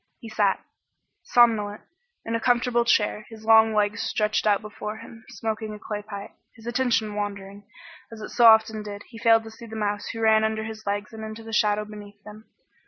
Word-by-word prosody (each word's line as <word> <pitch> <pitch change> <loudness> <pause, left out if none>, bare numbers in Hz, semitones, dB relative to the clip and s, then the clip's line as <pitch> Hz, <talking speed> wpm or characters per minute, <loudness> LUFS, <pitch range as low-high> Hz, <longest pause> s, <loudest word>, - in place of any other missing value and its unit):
He 230 - -10
sat, 205 -3 +1 0.6
somnolent, 215 -4 +2 0.4
in 230 - -3
a 230 - +1
comfortable 240 0 +2
chair, 210 -2 +1
his 220 -1 -12
long 220 0 +6
legs 210 +1 +1
stretched 215 0 0
out 205 -2 +4
before 210 0 -6
him, 225 0 -13
smoking 220 -2 -4
a - - -9
clay 210 0 -5
pipe. 205 -1 -8 0.2
His 225 -2 -16
attention 240 -3 0
wandering, 200 -1 -6 0.4
as 225 - -9
it 215 - -7
so 240 - +3
often 220 -1 +5
did, 205 -1 -8
he 225 - -11
failed 225 -1 +4
to 225 - -10
see 230 +1 -12
the 220 - -9
mouse 205 -1 -2
who 225 - -5
ran 220 -1 +4
under 220 0 -1
his 220 -1 -8
legs 205 +2 -3
into 220 0 -8
the 225 0 -9
shadow 210 0 +2
beneath 205 -1 -12
them. 215 +1 -13
220 Hz, 195 wpm, -25 LUFS, 210-225 Hz, 0.6 s, long